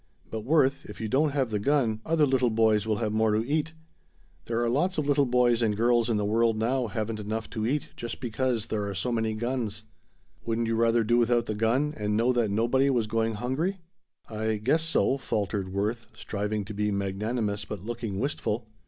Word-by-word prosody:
But, 110 Hz, -, -3 dB
Worth, 140 Hz, 0 st, +2 dB
if -, -, -10 dB
you 110 Hz, -, -2 dB
don't 140 Hz, +7 st, +2 dB
have 135 Hz, -4 st, -1 dB
the 105 Hz, -, 0 dB
gun, 115 Hz, -3 st, +1 dB
other 160 Hz, -2 st, +3 dB
little 130 Hz, -3 st, +2 dB
boys 110 Hz, -1 st, +2 dB
will 110 Hz, -, +2 dB
have 110 Hz, 0 st, -2 dB
more 110 Hz, 0 st, +2 dB
to 110 Hz, +2 st, 0 dB
eat. 155 Hz, +2 st, 0 dB, 0.7 s
There 115 Hz, 0 st, -1 dB
are -, -, +1 dB
lots 170 Hz, +10 st, +1 dB
of 155 Hz, -, 0 dB
little 145 Hz, -1 st, +3 dB
boys 120 Hz, -1 st, +3 dB
and 105 Hz, -3 st, +1 dB
girls 120 Hz, +1 st, +3 dB
in 115 Hz, -, +2 dB
the 105 Hz, -, 0 dB
world 115 Hz, +1 st, +2 dB
now 120 Hz, +3 st, 0 dB
haven't 110 Hz, +1 st, -3 dB
enough 110 Hz, +2 st, -3 dB
to 110 Hz, -1 st, -2 dB
eat 145 Hz, +3 st, -1 dB
just 120 Hz, -1 st, -6 dB
because 120 Hz, -2 st, -1 dB
there 105 Hz, -3 st, -2 dB
are 100 Hz, -, -5 dB
so 95 Hz, +8 st, -1 dB
many 110 Hz, -2 st, 0 dB
guns. 115 Hz, -2 st, -3 dB, 0.6 s
Wouldn't 115 Hz, 0 st, -1 dB
you 115 Hz, 0 st, 0 dB
rather 115 Hz, 0 st, +3 dB
do 120 Hz, +2 st, +3 dB
without 120 Hz, 0 st, +2 dB
the 110 Hz, -, -2 dB
gun 120 Hz, +8 st, +1 dB
and 105 Hz, 0 st, -1 dB
know 120 Hz, +3 st, +3 dB
that 120 Hz, -3 st, +1 dB
nobody 120 Hz, +6 st, +2 dB
was 120 Hz, -5 st, +2 dB
going 115 Hz, 0 st, 0 dB
hungry?" 135 Hz, -, -1 dB, 0.5 s
"I 110 Hz, 0 st, -1 dB
guess 130 Hz, +10 st, +1 dB
so," 160 Hz, -4 st, +1 dB
faltered 100 Hz, -6 st, -2 dB
Worth, 105 Hz, +4 st, -2 dB
striving 105 Hz, 0 st, -3 dB
to 105 Hz, -, -7 dB
be 105 Hz, +1 st, 0 dB
magnanimous 100 Hz, +2 st, -2 dB
but 105 Hz, -2 st, -7 dB
looking 115 Hz, -4 st, -4 dB
wistful. 120 Hz, -4 st, -2 dB
115 Hz, 205 wpm, -27 LUFS, 110-125 Hz, 0.7 s, other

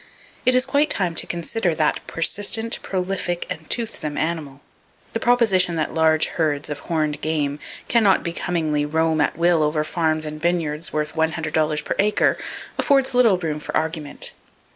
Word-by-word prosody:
It 255 Hz, -, +6 dB
is 255 Hz, +1 st, +4 dB
quite 295 Hz, +2 st, +2 dB
time 180 Hz, -4 st, +1 dB
to -, -, 0 dB
consider 175 Hz, +1 st, -2 dB
that 155 Hz, -1 st, +1 dB
persistent, 205 Hz, +6 st, +1 dB
prolific 180 Hz, -2 st, -2 dB
and 160 Hz, 0 st, -6 dB
toothsome 185 Hz, -10 st, -2 dB
animal. 155 Hz, -4 st, -3 dB, 0.5 s
The 225 Hz, -, -1 dB
proposition 215 Hz, -8 st, +3 dB
that 155 Hz, -1 st, -2 dB
large 160 Hz, -1 st, +3 dB
herds 150 Hz, -3 st, -2 dB
of 145 Hz, -, -4 dB
horned 155 Hz, -3 st, -2 dB
game 150 Hz, -2 st, -1 dB, 0.3 s
can 235 Hz, -2 st, +3 dB
not 195 Hz, -2 st, +4 dB
becomingly 165 Hz, -3 st, -1 dB
roam 160 Hz, +1 st, +1 dB
at 150 Hz, -, 0 dB
will 170 Hz, -1 st, +3 dB
over 150 Hz, 0 st, +1 dB
farms 155 Hz, -1 st, 0 dB
and 155 Hz, 0 st, -6 dB
vineyards 165 Hz, -2 st, -1 dB
worth 150 Hz, 0 st, -2 dB
one 160 Hz, 0 st, +1 dB
hundred 160 Hz, -2 st, -4 dB
dollars 155 Hz, -1 st, +1 dB
per -, -, -2 dB
acre, 210 Hz, +1 st, +2 dB, 0.4 s
affords 270 Hz, -2 st, +2 dB
little 235 Hz, -6 st, +4 dB
room 160 Hz, -4 st, -3 dB
for -, -, -2 dB
argument. 160 Hz, -2 st, -2 dB
160 Hz, 165 wpm, -22 LUFS, 155-185 Hz, 0.5 s, It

